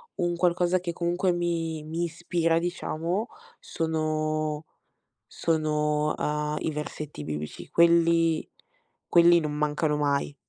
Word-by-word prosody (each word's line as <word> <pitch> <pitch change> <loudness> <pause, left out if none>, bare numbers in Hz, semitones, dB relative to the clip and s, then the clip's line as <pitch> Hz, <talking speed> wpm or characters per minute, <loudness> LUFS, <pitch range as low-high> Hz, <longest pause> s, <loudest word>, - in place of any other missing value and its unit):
un 175 -1 0
qualcosa 175 +1 +2
che 175 -1 -4
comunque 175 +2 0
mi 165 -3 -2
mi 165 +2 -3
ispira, 165 -1 0
diciamo, 175 +4 -2 0.3
sono 155 -1 -2 0.6
sono, 150 -1 0
uhm, 150 0 -1
i 160 - -1
versetti 150 - -6
biblici, 75 0 -6
quelli 170 -1 +3 0.6
quelli 170 0 +6
non 150 -1 -3
mancano 150 0 0
mai. 145 -1 0
160 Hz, 110 wpm, -27 LUFS, 150-170 Hz, 0.6 s, quelli